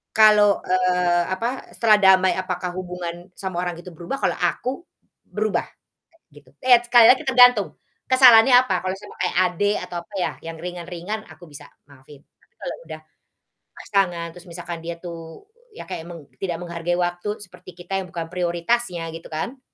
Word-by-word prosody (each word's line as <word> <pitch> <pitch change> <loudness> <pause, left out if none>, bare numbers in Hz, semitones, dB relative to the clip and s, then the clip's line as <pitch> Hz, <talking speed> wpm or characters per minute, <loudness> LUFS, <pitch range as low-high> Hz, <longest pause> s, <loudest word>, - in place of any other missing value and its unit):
kalau, 210 -2 +6
eee, 180 -1 +2
apa 230 +8 -3
setelah 220 -2 +4
damai 190 -1 +5
apakah 180 -1 -4
hubungan 180 -1 -7
sama 185 -2 -4
orang 175 -2 -3
itu 175 +1 -11
berubah? 170 +11 -5
Kalau - - 0
aku, 255 - -1 0.6
berubah, 215 -1 -1 0.7
gitu. 140 -3 -18
Eee, 245 -2 +5
sekali 240 -1 +6
lagi 260 +5 +5
tergantung, 245 -6 +4 0.3
kesalahannya 255 -2 +7
apa, 255 -6 -1
kalau 185 0 -2
sama - - -13
kayak - - -1 0.2
adik, 205 +3 +1
atau 175 - -6
apa 205 - -25
ya, - - 0
yang 165 0 -7
ringan-ringan 180 +4 -6
aku 175 - -14
bisa 145 -2 -13 0.2
maafin. 140 0 -17
Tapi - - -36
kalau - - -5
udah 155 -1 -8 0.8
pasangan 175 -5 -1
terus 180 +2 -14
misalkan 170 0 -7
dia 170 +1 -6
tuh, 165 - -10 0.3
ya - - -8
kayak 165 - -6
meng 170 -3 -10 0.2
tidak 175 -3 -2
menghargai 170 0 -3
waktu 175 +4 -2
seperti 185 - -14
kita 195 +2 -3
yang 185 - -8
bukan 165 0 -5
prioritasnya 175 +2 -1
gitu 165 - -10
kan. 230 - -5
180 Hz, 165 wpm, -22 LUFS, 170-210 Hz, 0.8 s, kesalahannya